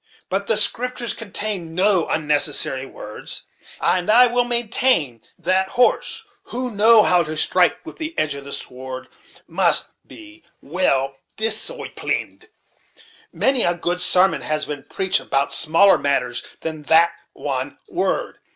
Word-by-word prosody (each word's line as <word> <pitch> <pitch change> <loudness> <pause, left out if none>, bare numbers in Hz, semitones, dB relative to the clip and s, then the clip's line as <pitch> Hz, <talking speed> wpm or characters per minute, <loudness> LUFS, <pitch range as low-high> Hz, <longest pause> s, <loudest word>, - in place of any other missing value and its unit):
But 200 +1 -2
the 220 - +2
Scriptures 245 +2 +1
contain 200 -6 -4
no 185 -2 +3
unnecessary 145 -3 +1
words; 105 -4 -8 0.4
and 180 +1 0
I 240 +3 +7
will 245 0 0
maintain 235 - 0 0.2
that 185 +2 0
horse, 255 - 0 0.2
who 255 -8 -4
know 220 +1 +6
how 180 -1 +4
to 155 -1 -4
strike 180 - +3
with 330 - -10
the 320 +1 -6
edge 155 -2 0
of 140 0 -8
the 140 - -10
sword, 130 0 -6 0.4
must - - +2 0.2
be 325 0 -14 0.2
well 135 -5 -1 0.2
disoiplyned. 225 - -2 0.8
Many 265 -2 +1
a 175 -4 +2
good 175 +1 -3
sarmon 180 -4 +2
has 155 +4 -2
been 145 -2 -7
preached 190 -1 0
about 140 +1 -1
smaller 170 +5 +4
matters 125 -4 -1 0.2
than 160 -1 -5
that 165 +1 +5 0.2
one 135 -1 -5
word! - - -2
180 Hz, 135 wpm, -20 LUFS, 145-230 Hz, 0.8 s, I